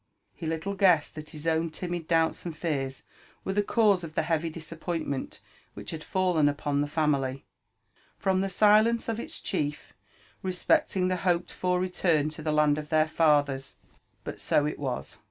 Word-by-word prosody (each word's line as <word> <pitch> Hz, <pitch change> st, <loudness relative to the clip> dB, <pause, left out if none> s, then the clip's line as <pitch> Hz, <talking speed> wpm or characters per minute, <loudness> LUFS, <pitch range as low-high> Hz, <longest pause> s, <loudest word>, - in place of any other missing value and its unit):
He 165 Hz, -, -6 dB
little 165 Hz, +5 st, -2 dB
guessed 185 Hz, -6 st, +3 dB
that 155 Hz, 0 st, -8 dB
his 155 Hz, -1 st, -9 dB
own 165 Hz, 0 st, +1 dB
timid 175 Hz, 0 st, -5 dB
doubts 165 Hz, -1 st, +2 dB
and 170 Hz, -3 st, -6 dB
fears 135 Hz, -6 st, -2 dB, 0.4 s
were 195 Hz, -, -1 dB
the 205 Hz, -, +3 dB
cause 205 Hz, -3 st, +3 dB
of 160 Hz, -1 st, -8 dB
the -, -, +1 dB
heavy 165 Hz, 0 st, 0 dB
disappoint 165 Hz, +1 st, -5 dB
ment 140 Hz, -2 st, -4 dB, 0.4 s
which 100 Hz, +1 st, -6 dB
had 155 Hz, -1 st, -6 dB
fallen 180 Hz, -6 st, +2 dB
upon 145 Hz, 0 st, -1 dB
the 145 Hz, -, 0 dB
family, 140 Hz, -4 st, 0 dB, 0.7 s
from 190 Hz, -1 st, +1 dB
the 195 Hz, -, -1 dB
silence 215 Hz, +4 st, +4 dB
of 230 Hz, -1 st, -2 dB
its -, -, -5 dB
chief 150 Hz, -5 st, -3 dB, 0.5 s
re 185 Hz, -1 st, -2 dB
specting 180 Hz, +1 st, +2 dB
the 185 Hz, 0 st, 0 dB
hoped 175 Hz, -1 st, 0 dB
for 180 Hz, 0 st, 0 dB
return 175 Hz, -4 st, +1 dB
to 155 Hz, +1 st, -8 dB
the 155 Hz, 0 st, -1 dB
land 150 Hz, -1 st, +3 dB
of 150 Hz, 0 st, -8 dB
their 155 Hz, -1 st, +3 dB
fathers. 145 Hz, -4 st, +2 dB, 0.5 s
But -, -, -6 dB
so 145 Hz, -, +2 dB
it 150 Hz, -, -3 dB
was. 135 Hz, -3 st, -4 dB
160 Hz, 180 wpm, -28 LUFS, 150-180 Hz, 0.7 s, silence